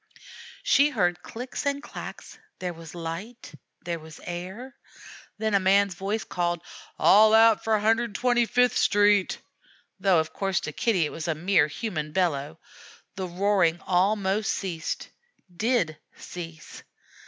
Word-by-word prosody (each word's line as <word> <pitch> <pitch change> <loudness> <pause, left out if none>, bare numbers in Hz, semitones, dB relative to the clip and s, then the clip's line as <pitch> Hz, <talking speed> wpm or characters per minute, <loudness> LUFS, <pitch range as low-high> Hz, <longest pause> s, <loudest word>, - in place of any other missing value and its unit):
She 285 +2 +4
heard 180 -10 0
clicks 250 +3 -6
and 280 0 -1
clacks. - - -9 0.2
There 180 -1 -4
was 165 0 -11
light; 175 +7 -7 0.3
there 170 -1 -3
was 160 0 -12
air. 190 +9 -7 0.6
Then 220 0 -1
a 200 - +5
man's 195 +1 +3
voice 195 +5 -3
called, 175 -1 -2 0.3
"All 215 +2 +6
out 225 -1 +5
for 220 -1 +2
125th 240 +2 +2
Street," 205 -2 +3 0.6
though 190 -3 +3
of 160 0 -3
course 195 -1 0
to - - -5
Kitty 200 -9 +1
it - - -4
was 165 0 -6
a 165 - 0
mere 170 -1 +3
human 155 -3 -4
bellow. 160 -4 -1 0.6
The 190 -1 -4
roaring 180 -2 +1
almost 195 +3 +1
ceased 170 -5 -4 0.5
did 210 -6 +1 0.2
cease. 165 -3 -9
190 Hz, 130 wpm, -26 LUFS, 170-220 Hz, 0.6 s, All